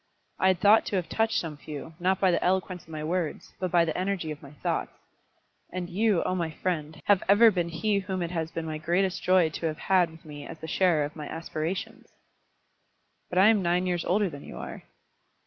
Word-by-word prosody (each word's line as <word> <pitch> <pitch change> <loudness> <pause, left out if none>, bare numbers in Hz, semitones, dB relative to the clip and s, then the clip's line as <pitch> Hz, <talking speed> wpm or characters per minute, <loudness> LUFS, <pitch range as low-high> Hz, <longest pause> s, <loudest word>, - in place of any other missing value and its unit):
I 190 - +3
had 185 -2 +3
thought 210 +2 +5
to - - -2
have 180 -3 -1
touched 225 0 +1
some 155 -3 -5
few, 150 +2 -8
not 185 +2 +1
by 190 -2 +4
the - - +1
eloquence 185 -1 0
of - - -22
my 155 -1 -5
words, 165 0 -3
but 185 0 -1
by 170 -1 +4
the 160 - -2
energy 185 -4 -1
of 150 - -7
my 140 - -11
thoughts; 150 - -2 0.8
and 180 -1 -4
you, 205 -1 +2
oh - - -1
my 170 -3 -1
friend, 155 -2 -3
have 200 -2 +4
ever 220 +3 +7
been 175 -3 -1
he 200 +5 0
whom 185 -2 -3
it 170 - -4
has 165 -2 -2
been 165 -1 -5
my 155 -1 -4
greatest 180 +4 0
joy 185 -3 +4
to 165 - -3
have 155 -1 -3
had 185 -2 +3
with 160 0 -16
me 145 -1 -8
as 165 - -8
the 160 - -8
sharer 165 -3 +2
of 150 - -8
my 150 -2 -6
aspirations." 165 +2 -4 1.2
"But 180 - -3
I 195 +3 +7
am 220 -3 +4
nine 175 +1 +1
years 175 -2 0
older 200 +3 +2
than 145 -5 -8
you - - -9
are." - - -7
175 Hz, 225 wpm, -27 LUFS, 160-190 Hz, 1.2 s, ever